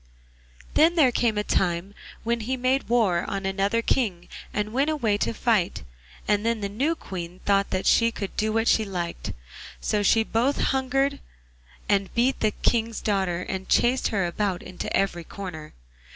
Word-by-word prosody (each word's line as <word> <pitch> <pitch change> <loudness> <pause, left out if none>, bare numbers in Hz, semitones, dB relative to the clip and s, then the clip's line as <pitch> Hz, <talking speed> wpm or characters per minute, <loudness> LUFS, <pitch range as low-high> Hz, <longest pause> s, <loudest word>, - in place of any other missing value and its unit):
Then 330 +3 +5
there 290 -7 +5
came 230 -3 +1
a 210 - +1
time 180 0 0 0.3
when 235 +1 0
he 255 +4 -2
made 255 +1 0
war 210 -8 +2
on 195 -1 -3
another 195 +4 0
King 190 -11 0 0.2
and 210 +1 -2
went 275 +4 +2
away 240 -10 +1
to - - 0
fight, 220 - 0 0.4
and 210 0 +2
then 230 -1 0
the 200 - -2
new 275 +11 0
Queen 180 - -7
thought 200 -1 +2
that 185 - -2
she 230 0 +5
could 200 -3 -6
do 215 +1 0
what 225 +1 +1
she 220 - +4
liked; 180 -4 -4 0.5
so 210 - 0
she 225 +2 +4
both 240 +6 0
hungered 270 +1 +1 0.7
and 200 -1 +1
beat 250 +3 +2
the 215 - +3
King's 230 +1 0
daughter 190 -4 0
and 190 0 -5
chased 250 +2 +3
her 195 -4 0
about 185 +1 -2
into 185 - -6
every 180 -3 0
corner. 160 -4 -8
210 Hz, 170 wpm, -25 LUFS, 190-240 Hz, 0.7 s, Then